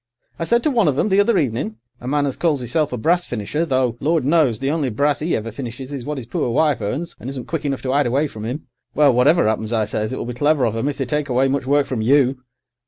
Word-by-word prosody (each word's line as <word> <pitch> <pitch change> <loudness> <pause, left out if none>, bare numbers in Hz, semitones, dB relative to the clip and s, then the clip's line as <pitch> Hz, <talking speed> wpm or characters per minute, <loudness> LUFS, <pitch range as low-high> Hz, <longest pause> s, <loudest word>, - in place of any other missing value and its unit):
I 165 - -1
said 235 +5 +2
to 305 - +2
one 230 - +2
of 140 -3 +1
'em, 215 - +1
the 195 +1 +3
other 205 +1 +3
evening—a 120 -4 -4
man 145 +1 +1
as 135 - -2
calls 150 -7 0
'isself 145 +5 0
a 125 - -3
brass 175 +9 +1
finisher, 125 +9 -2
though, 130 -4 +1
Lord 160 -3 +1
knows, 145 -6 +3
the 135 +4 -1
only 150 -4 0
brass 145 +6 0
'e 165 +3 0
ever 115 +1 -4
finishes 130 +3 -7
is 135 -4 -5
what 150 0 -3
'is 130 - -6
poor 120 - -2
wife 140 0 +2
earns 135 +12 -3
and 125 - -6
isn't 135 -3 -6
quick 160 -2 -4
enough 140 -2 -2
to 130 0 -1
'ide 145 -2 +2
away 135 +5 +1
from 110 -7 -7
'im—well, 130 +3 0
whatever 140 +5 +4
'appens, 110 0 -1
I 110 -2 +1
says, 110 +1 -3
it 130 - -3
will - - -4
be 120 - -4
clever 145 +1 +2
of 115 -1 -1
'em 115 +5 -1
if 145 - -2
they 135 - -1
take 150 +2 -2
away 130 +2 +2
much 135 -1 -1
work 145 0 +3
from 125 -5 -3
you. 130 +2 +3
135 Hz, 270 wpm, -20 LUFS, 120-150 Hz, -, whatever